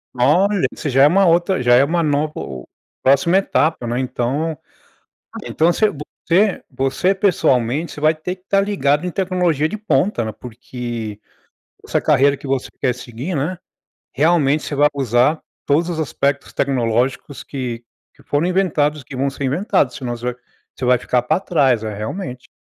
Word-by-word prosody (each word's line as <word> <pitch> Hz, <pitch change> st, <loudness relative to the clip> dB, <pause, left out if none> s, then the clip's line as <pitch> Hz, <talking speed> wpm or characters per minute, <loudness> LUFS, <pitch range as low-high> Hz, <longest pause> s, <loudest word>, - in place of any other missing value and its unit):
Olha, 180 Hz, +10 st, +3 dB
isso 150 Hz, -, -4 dB
já 135 Hz, +1 st, +4 dB
é -, -, +8 dB
uma 195 Hz, +5 st, +4 dB
outra 170 Hz, -1 st, +2 dB
já 120 Hz, 0 st, +5 dB
é 130 Hz, -, +6 dB
uma 170 Hz, +4 st, +1 dB
nova 150 Hz, -1 st, 0 dB
o 65 Hz, -2 st, -7 dB, 0.4 s
próxima 140 Hz, +7 st, +4 dB
etapa, 160 Hz, -8 st, +1 dB
né. 120 Hz, +1 st, -1 dB
Então 130 Hz, +5 st, -2 dB, 0.9 s
então 165 Hz, +2 st, +2 dB
voc -, -, -4 dB, 0.5 s
você 195 Hz, +4 st, +3 dB
você 135 Hz, +8 st, 0 dB
pessoalmente, 150 Hz, -, +1 dB
você -, -, -9 dB
vai 155 Hz, +1 st, +3 dB
ter 170 Hz, +4 st, -5 dB
que 180 Hz, -, -32 dB
estar 195 Hz, +1 st, +2 dB
ligado 180 Hz, -6 st, +1 dB
em 180 Hz, -, -2 dB
tecnologia 180 Hz, -5 st, 0 dB
de 215 Hz, -, -5 dB
ponta, 185 Hz, -, 0 dB
né. 110 Hz, -, -3 dB
Porque, 120 Hz, -2 st, -7 dB, 0.7 s
essa -, -, 0 dB
carreira 140 Hz, +1 st, +3 dB
que 140 Hz, -, -11 dB
você 135 Hz, -1 st, -1 dB
quer 125 Hz, -, +1 dB
seguir, 125 Hz, +7 st, -6 dB
né, 165 Hz, +6 st, -2 dB, 0.5 s
realmente 150 Hz, -1 st, +2 dB
você -, -, -4 dB
vai 145 Hz, +1 st, +4 dB
usar 130 Hz, +3 st, +2 dB, 0.3 s
todos 155 Hz, +4 st, +2 dB
os 165 Hz, -, -4 dB
aspectos 140 Hz, -2 st, -1 dB
tecnológicos 125 Hz, +1 st, -1 dB
que 120 Hz, -4 st, -5 dB, 0.3 s
que -, -, -21 dB
foram 145 Hz, +4 st, 0 dB
inventados, 155 Hz, -6 st, +1 dB
que 130 Hz, -, -10 dB
vão 135 Hz, +2 st, 0 dB
ser 135 Hz, +1 st, -7 dB
inventados, 140 Hz, -, +1 dB
se -, -, -8 dB
não 120 Hz, -1 st, -3 dB
você 120 Hz, -, -11 dB, 0.6 s
vai 125 Hz, 0 st, +4 dB
você -, -, -5 dB
ficar 125 Hz, -, +1 dB
pra 125 Hz, -, 0 dB
trás. 135 Hz, -, +2 dB
É, 110 Hz, -1 st, -4 dB
realmente. 125 Hz, -, -6 dB
140 Hz, 175 wpm, -19 LUFS, 125-170 Hz, 0.9 s, é